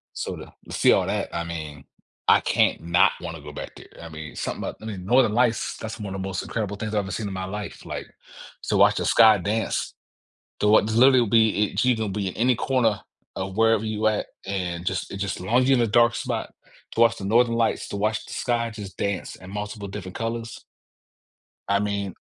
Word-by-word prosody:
So, - - -4
to - - -11 0.2
see - - +4
all 95 - +2
that, 100 0 -2
I 85 - -1
mean, 80 -4 -7 0.4
I - - +7
can - - +2
not 85 +2 +4
want 85 -2 -5
to 75 - -11
go 75 - -8
back 75 - -8
there, - - -13
I 85 - -8
mean, 75 -2 -8
something - - -4
about, - - -5
I - - -9
mean, 100 -5 -6
Northern 120 0 +4
Lights, 120 -1 +1
that's 110 0 -7
one 100 -2 -5
of 95 - -4
the 95 - -3
most 95 -1 -3
incredible 105 -3 -4
things 110 0 -4
I've - - +3
ever 95 - -6
seen 105 +4 -3
in 100 - -5
my 95 0 -4
life, 100 +1 -7
like, - - -6 0.5
so - - 0
watch - - +5
the - - -1
sky 110 -2 +6
dance, 105 +5 -1 0.7
to 105 - +3
wa 110 - +7
literally 125 +5 +5
will 120 - +2
be 110 -1 +4
it 100 - 0
you 125 - +4
gonna 110 -2 -2
be 100 -1 -2
in - - -9
any 125 +2 +3
corner 115 -5 +1 0.3
of 95 0 -4
wherever 115 -1 +4
you're 110 0 +1
at, 105 - -2 0.2
and 90 -3 -3
just 95 -2 -2
it 100 - -5
just 100 0 -3
as - - -9
long 115 +7 +2
as 130 - +1
you're 135 - +5
in 120 - +3
a - - +1
dark 120 +2 +4
spot - - -3 0.4
to 115 - 0
watch 115 -1 +5
the 100 - -6
Northern 115 +3 +3
Lights, 115 -1 0
to 100 - -4
watch 110 +2 -1
the - - -9
sky 115 -2 -1
just 105 -4 -9
dance 100 -2 -3
in 95 0 -12
multiple 105 0 -5
different 95 -2 -7
colors. 115 0 -4 1.0
I 100 0 +2
mean, 100 -2 -2
105 Hz, 235 wpm, -24 LUFS, 95-115 Hz, 1.0 s, I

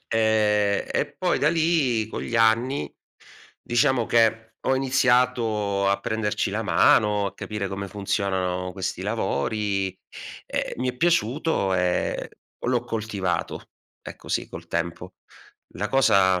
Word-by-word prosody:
ehm, 105 -2 +2
e - - -1
poi - - +1
da - - +3
lì, 155 -9 +1
con 110 - -6
gli 115 - -3
anni, 115 +5 +2 0.7
diciamo 120 0 +1
che 115 -1 +2 0.2
ho 130 - +3
iniziato 120 -6 +1
a 100 - +2
prenderci 105 -1 -1
la 110 +3 -2
mano, 105 +2 +3
a 95 - -6
capire 105 -1 -4
come 100 +1 -5
funzionano 95 -2 -2
questi 95 -1 -4
lavori, 100 +5 -1 0.6
ehm, - - -3
mi 125 +2 -2
è 125 - -16
piaciuto 135 - +1
e 90 -1 0 0.4
l'ho 120 -1 +1
coltivato. 110 -6 -3 0.3
Ecco, - - -11
sì, - - -1
col - - -10
tempo. 85 0 -4 0.6
La 105 +4 -3
cosa 95 -9 +4
110 Hz, 130 wpm, -24 LUFS, 100-120 Hz, 0.7 s, cosa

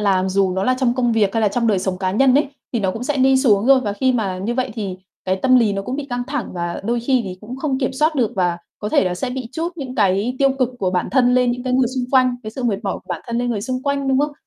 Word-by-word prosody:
làm 190 -2 +2
dù 190 -1 +1
nó 190 +1 -1
là 255 - +2
trong 245 -2 +2
công 240 -2 +1
việc 210 -3 +1
hay 225 - +2
là 210 - +3
trong 235 +3 -1
đời 205 -4 +2
sống 185 -1 -2
cá 185 -1 -1
nhân 255 +5 +3
ấy, 285 -1 +3 0.2
thì 235 - 0
nó 190 -1 +1
cũng 235 +2 -5
sẽ 290 +1 -1
đi 265 0 +4
xuống 225 -5 +3
rồi. 270 -1 +6
Và 205 -4 -2
khi 260 +5 +1
mà 195 -6 -1
như 225 +6 -2
vậy 255 -2 -1
thì 195 -5 -4 0.3
cái 185 0 0
tâm 255 +6 +4
lý 215 -4 +2
nó 195 - -2
cũng 250 +6 -4
bị 285 -1 -5
căng 245 0 -2
thẳng 280 -2 -3
và 175 -1 -4
đôi 235 +2 0
khi 255 +1 +2
thì 185 -1 -7
cũng 240 +5 -8
không 270 -2 -1
kiểm 260 -1 -1
soát 305 +4 +1
được 245 -7 +1
và 175 -2 +1 0.2
có 210 - -4
thể 200 - +3
là 180 - -1
sẽ 250 +8 -3
bị 255 -2 -5
trút 335 +4 -3
những 260 -4 -6
cái 205 +3 +1
tiêu 275 -1 +4
cực 255 -2 +2
của 185 -1 0
bản 180 -1 -1
thân 250 -1 +3
lên 250 -1 +3
những 245 +1 -3
cái 255 - -1
người 255 -2 +3
xung 255 -1 -2
quanh 255 -2 +3
cái 215 - -6
sự 250 +3 -5
mệt 215 -5 +1
mỏi 195 -3 -2
của - - -11
bản - - -3
thân 235 0 -2
lên 245 0 -1
người 215 -4 -2
xung 255 +3 -3
quanh, 280 -1 -1
đúng 265 0 +3
không? 295 +1 0
240 Hz, 325 wpm, -20 LUFS, 200-260 Hz, 0.3 s, rồi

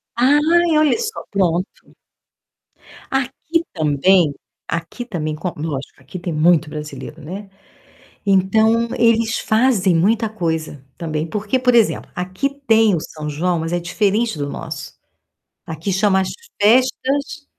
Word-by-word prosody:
Ai, 305 +6 +4
olhe 305 +2 +3
só, 445 -2 -4
pronto. 185 -2 -1 1.1
Aqui 270 +5 -1
também, 155 +2 +3 0.3
aqui 170 +9 -4
também 155 -9 -3
co 170 +3 -4
lógico, 145 -3 -5
aqui 140 +8 -8
tem 175 -1 -4
muito 160 0 +3
brasileiro, 150 +1 -8
né, 195 +6 -8 0.8
então 220 +4 +3
eles 230 -1 +3
fazem 220 -5 +2
muita 220 +7 +2
coisa 160 -8 -3
também, 155 -1 -3
porque, 210 +7 -1
por 250 -1 +2
exemplo, 230 -2 +2
aqui 185 +9 -2 0.2
tem 225 -2 +5
o 165 - 0
São 155 0 -7
João, 170 +4 0
mas 165 +1 -4
é 175 - +1
diferente 205 +3 0
do 145 -1 -2
nosso. - - -7 0.7
Aqui 160 +4 -4
chama 190 0 +3
as 185 - -2 0.3
festas 265 +6 +2
195 Hz, 130 wpm, -19 LUFS, 165-235 Hz, 1.1 s, tem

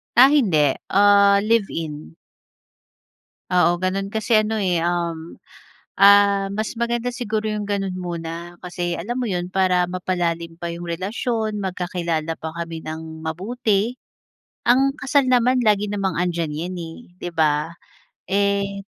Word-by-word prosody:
Ah, 255 +3 +8
hindi. 165 - +3
Ah, 200 0 +5
live 220 -2 +2
in. 155 -1 -6 1.4
Oo, 175 -1 +3
ganoon. 195 +2 -2
Kasi 220 +2 +1
ano 220 +1 -2
eh, 180 -4 +1
um, 170 -1 -2 0.7
ah, 200 0 +6
mas 215 +2 -3
maganda 235 +1 -1
siguro 220 -3 -2
yung 210 -1 -3
ganoon 195 -2 -2
muna. 170 -2 -5 0.3
Kasi, 175 -1 -3
alam 220 +8 -4
mo - - -1
iyon? 175 -2 -2
Para 185 -2 +2
mapalalim 175 -2 -2
pa 170 - -4
yung 170 +1 -7
relasyon, 215 +5 -2
magkakilala 175 -4 -2
pa 160 - -5
kami 165 -1 -5
nang 160 0 -7
mabuti. 210 +6 -1 0.7
Ang 265 +3 +4
kasal 275 -1 +2
naman 250 +1 +3
lagi 210 -2 +2
namang 195 -4 -1
andiyan 170 -3 -1
iyan 175 +5 -4
eh, 165 -1 -7 0.2
'di 175 - -4
ba? 155 0 +1 0.6
Eh 200 0 0
185 Hz, 135 wpm, -22 LUFS, 170-210 Hz, 1.4 s, Ah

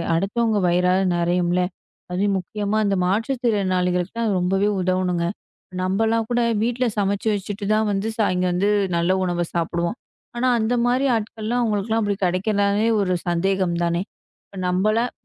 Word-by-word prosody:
அடுத்தவங்க 215 +4 0
வயிறாவது 180 +2 +2
நிறையும் 175 +1 +1
இல்ல. 180 - +2 0.5
அதுவும் 195 +2 +1
முக்கியமா 205 +3 -2
அந்த 200 -1 +1
மாற்றுத்திறனாளிகளுக்கு 195 -3 0 0.2
ரொம்பவே 190 +3 +1
உதவனுங்க. 180 -1 0 0.6
நம்மல்லாம் 220 +4 +1
கூட 240 0 +1 0.2
வீட்ல 245 +2 0
சமைச்சு 200 +1 0
வச்சிட்டு 205 0 -4
தான் 215 0 +2
வந்து 200 +2 -1
சாயங் 185 -4 +1
வந்து 190 +4 +1 0.3
நல்ல 170 +2 +1
உணவ 175 -1 -1
சாப்பிடுவோம். 170 +4 -1 0.4
ஆனா 245 +2 0
அந்தமாரி 245 +3 +1
ஆட்கள்லாம் 220 +2 -2
அவுங்களுக்குலாம் 220 0 0
அப்பிடி 205 -2 -1
கிடைக்கிறனாலே 200 +3 +1
ஒரு 185 -2 0
சந்தேகம் 180 +1 +1
தானே! 170 +1 0 0.5
இப்ப 195 - -12
நம்பலாம் 215 +6 +1
200 Hz, 130 wpm, -22 LUFS, 180-220 Hz, 0.6 s, வயிறாவது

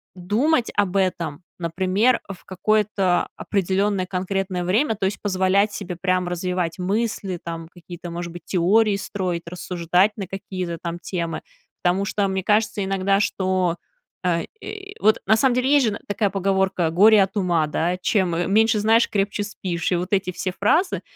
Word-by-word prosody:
думать 230 - +1
об 200 -2 +1
этом, 175 -4 -1 0.2
например, 185 +8 +1
в 195 - -8
какое-то 195 -1 +1
определённое 195 0 0
конкретное 185 0 -2
время, 220 +6 +2
то 195 -2 -2
есть 195 +1 -2
позволять 195 +1 +2
себе 180 -4 -5
прям 185 -1 +1
развивать 180 -1 -2
мысли, 195 -1 -1
там 165 -1 -6
какие-то, 175 0 -10
может 170 0 -5
быть, 175 - -9
теории 200 +3 +3
строить, 185 -4 -3
рассуждать 180 +3 +1
на 195 - -4
какие-то 185 -2 -5
там 170 0 -4
темы? 170 -2 -4 0.4
Потому 185 +3 +2
что 200 0 0
мне 190 -1 -2
кажется 215 0 +1
иногда, 195 0 +1
что, 185 -3 0 0.5
э, 170 -2 +1 0.2
и 405 -1 -8
Вот, 215 +1 +4
на 220 +2 +5
самом 255 0 +3
деле, 255 +1 +1
есть 285 -4 +5
же, 210 - 0
н - - -6
такая 205 0 0
поговорка: 190 -3 +1
"Горе 205 +3 +6
от 195 +2 -4
ума", 170 -5 +1
да, 175 +4 -1
"Чем 185 -5 +1
м-меньше 215 +5 +3
знаешь, 225 +2 +4
крепче 205 +1 -1
спишь". 185 -4 -3
И - - +3
вот 180 +2 -3
эти 190 -2 +1
все 185 +1 -3
фразы, 340 - +2
190 Hz, 165 wpm, -22 LUFS, 180-205 Hz, 0.5 s, Горе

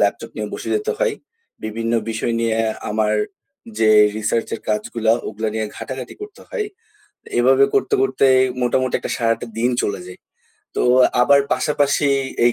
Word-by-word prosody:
Laptop - - 0
নিয়ে - - -3
বসে - - -6
যেতে 430 +2 -1
হয়। - - +1 0.5
বিভিন্ন 115 +2 -3 0.2
বিষয় 115 +1 -2
নিয়ে 115 -1 +1 0.3
আমার 110 0 +1 0.6
যে 110 - +4 0.3
রিসার্চ-এর 110 +1 -1
কাজগুলা, 110 +1 0 0.2
ওগুলা 110 +1 -3
নিয়ে 110 -1 -1
ঘাটাঘাটি 130 -1 -6
করতে 415 0 -10
হয়। 455 -4 -3 0.7
এভাবে 130 +2 +5
করতে, 410 +2 +1
করতে 400 - +2 0.4
মোটামুটি 130 +1 +1
একটা - - -5
সারাটা 115 0 0
দিন 125 +2 +2
চলে 100 - -2
যায়। 90 - -11 0.6
তো - - +1 0.4
আবার 140 +3 +5
পাশাপাশি 145 -1 +1 0.4
এই 120 - +5
120 Hz, 145 wpm, -20 LUFS, 110-140 Hz, 0.7 s, এভাবে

